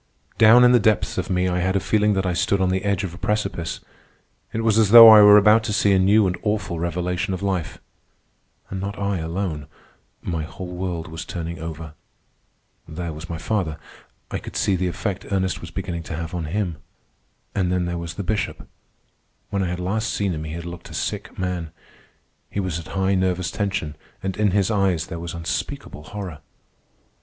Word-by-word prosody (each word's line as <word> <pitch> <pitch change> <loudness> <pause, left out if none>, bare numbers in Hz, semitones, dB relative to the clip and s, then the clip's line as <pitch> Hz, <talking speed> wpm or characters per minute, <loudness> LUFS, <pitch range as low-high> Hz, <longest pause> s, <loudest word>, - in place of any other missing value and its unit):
Down 115 +3 +8
in 125 - +7
the 125 - +6
depths 110 -2 +1
of 95 - -4
me 90 -1 +1
I 90 0 0
had 95 +2 0
a - - +3
feeling 105 +2 +2
that 95 -1 -1
I 90 - 0
stood 100 +3 +1
on 95 -1 +2
the 95 0 -1
edge 100 -1 0
of 90 -3 -4
a 90 - -11
precipice. 105 -6 -2 0.7
It 115 - -2
was 110 -1 +3
as 110 -3 +4
though 115 +1 +11
I 110 -1 +10
were 105 0 +9
about 105 +2 +5
to 105 - -2
see 100 0 +3
a 95 - +4
new 100 +3 +4
and 90 -1 0
awful 105 -5 -2
revelation 90 +2 -2
of 95 - -7
life. 95 -6 -2 0.9
And 95 -1 -4
not 100 +1 -4
I 100 -2 -1
alone. 80 -2 -3 0.6
My 85 -3 -2
whole 90 +3 -8
world 90 -2 -4
was 80 0 -6
turning 85 -1 -6
over. 80 -1 -7 0.9
There 85 0 -5
was 80 +2 -9
my 85 - -4
father. 90 -4 -2 0.5
I - - -2
could - - -10
see 100 - +1
the 90 0 -1
effect 95 +2 -4
Ernest 95 -2 -1
was 85 - -8
beginning 85 -1 -4
to 80 - -3
have 80 +2 -5
on 85 -3 -3
him. 90 0 -2 0.8
And 95 -3 0
then 90 -1 0
there 85 0 -3
was 85 -1 -6
the 100 - -4
Bishop. 105 +2 -3 0.8
When 100 -1 0
I 95 - 0
had 90 0 -3
last 110 +5 -1
seen 100 -3 -1
him 80 -1 -5
he 80 - -6
had 85 0 -6
looked 85 0 -8
a - - -9
sick - - -4
man. 90 -3 -3 0.8
He - - -4
was 90 -4 -2
at 85 - -10
high 95 0 +2
nervous 95 -2 0
tension, 100 -7 -2 0.3
and 95 0 -2
in 105 0 +2
his 100 +2 +1
eyes 95 -6 +1
there 85 - -7
was 85 +1 -6
unspeakable 80 -2 -5
horror. 95 -4 -7
95 Hz, 205 wpm, -22 LUFS, 85-100 Hz, 0.9 s, though